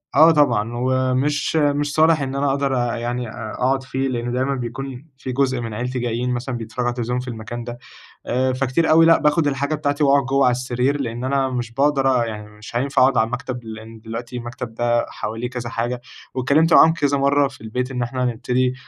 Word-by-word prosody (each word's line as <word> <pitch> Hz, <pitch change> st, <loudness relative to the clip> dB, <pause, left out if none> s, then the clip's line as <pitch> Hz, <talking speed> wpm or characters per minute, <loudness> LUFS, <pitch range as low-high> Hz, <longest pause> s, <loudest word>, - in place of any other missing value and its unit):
آه 160 Hz, +3 st, +8 dB
طبعًا، 120 Hz, -8 st, +2 dB
ومش 130 Hz, +4 st, 0 dB
مش 145 Hz, -1 st, +1 dB
صالِح 160 Hz, -1 st, +4 dB
إن 135 Hz, 0 st, -3 dB
أنا 140 Hz, 0 st, +1 dB
أقدر 140 Hz, -1 st, 0 dB
أ 120 Hz, -1 st, 0 dB
يعني 120 Hz, 0 st, -3 dB
أ 110 Hz, -1 st, -7 dB
أقعُد 130 Hz, +1 st, +1 dB
فيه، 130 Hz, +1 st, -2 dB
لإن 120 Hz, -1 st, -2 dB
دايمًا 130 Hz, +2 st, 0 dB
بيكون 130 Hz, +3 st, -6 dB
في 130 Hz, -, -5 dB
جزء 130 Hz, -1 st, 0 dB
من 115 Hz, -2 st, -5 dB
عيلتي 125 Hz, +3 st, -3 dB
جايين 120 Hz, +1 st, -2 dB
مثلًا 125 Hz, +1 st, -3 dB
بيتفرّجوا 115 Hz, +2 st, -4 dB
على -, -, +1 dB
التلفزيون 120 Hz, 0 st, -2 dB
في 125 Hz, -, -7 dB
المكان 120 Hz, 0 st, -6 dB
ده. 120 Hz, 0 st, -7 dB, 0.5 s
آآ، 130 Hz, +1 st, +1 dB
فكتير 135 Hz, +5 st, +1 dB
أوي 165 Hz, +1 st, +7 dB
لأ، 165 Hz, -, +6 dB
باخد 150 Hz, +1 st, +2 dB
الحاجة 140 Hz, +2 st, 0 dB
بتاعتي 145 Hz, 0 st, -1 dB
وأقعُد 140 Hz, -1 st, +4 dB
جوّا 135 Hz, +1 st, +2 dB
على 125 Hz, -, +4 dB
السرير، 125 Hz, +3 st, 0 dB
لإن 120 Hz, -1 st, -4 dB
أنا 135 Hz, 0 st, +1 dB
مش 120 Hz, -2 st, -4 dB
بأقدر 135 Hz, -2 st, +2 dB
أ -, -, -2 dB
يعني 105 Hz, -2 st, -7 dB
مش 105 Hz, +2 st, -12 dB
هينفع 135 Hz, +2 st, +1 dB
أقعُد 130 Hz, 0 st, +4 dB
على 110 Hz, -, +3 dB
المكتب، 125 Hz, +1 st, -4 dB
لإن 110 Hz, 0 st, -9 dB
دلوقتي 120 Hz, +3 st, -6 dB
المكتب 120 Hz, -1 st, -6 dB
ده 120 Hz, 0 st, +1 dB
حواليه 115 Hz, +3 st, -4 dB
كذا 125 Hz, -2 st, -5 dB
حاجة، 120 Hz, +2 st, -3 dB, 0.3 s
واتكلّمت 145 Hz, +6 st, +3 dB
معاهم 160 Hz, +1 st, +7 dB
كذا 145 Hz, -3 st, +1 dB
مرّة 140 Hz, +1 st, +3 dB
في 135 Hz, -5 st, -14 dB
البيت 125 Hz, +4 st, -3 dB
إن 125 Hz, -2 st, -3 dB
إحنا 125 Hz, +1 st, -3 dB
هنبتدي 125 Hz, +1 st, 0 dB
125 Hz, 210 wpm, -21 LUFS, 120-140 Hz, 0.5 s, آه